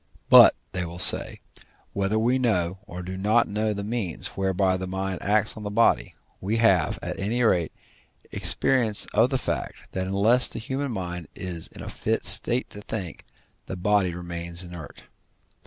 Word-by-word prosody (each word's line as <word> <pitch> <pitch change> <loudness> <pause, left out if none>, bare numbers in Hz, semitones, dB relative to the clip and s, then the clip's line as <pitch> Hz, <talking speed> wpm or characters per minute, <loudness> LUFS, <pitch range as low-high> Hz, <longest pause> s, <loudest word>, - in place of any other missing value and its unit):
But, - - +9 0.2
they 90 - -3
will 85 0 -7
say, 90 - +5 0.5
whether 100 +2 -1
we 120 +4 +1
know 95 -7 0
or 90 +1 -8
do 95 +1 -6
not 110 +5 +2
know 105 +1 -1
the 100 -1 -4
means 105 -6 -2
whereby 95 -1 0
the 95 0 -5
mind 95 -1 -4
acts 105 +1 +2
on 110 - -9
the 105 - -5
body, 115 +3 +1 0.2
we 105 +4 -2
have, 95 -9 +2
at - - -5
any 115 +5 -1
rate, 90 -7 +1 0.6
experience 115 -6 +2
of 115 +4 +3
the 135 - 0
fact 85 - -5
that 95 0 -3
unless 105 +6 +3
the - - -7
human 135 +4 -4
mind 90 -5 -5
is 85 -3 -4
in - - -12
a - - -8
fit - - -2
state 125 +2 +3
to 105 - -10
think, 95 -7 -7 0.4
the 95 - -6
body 100 0 +1
remains 85 0 -5
inert. 85 -4 -11
95 Hz, 170 wpm, -24 LUFS, 90-110 Hz, 0.6 s, But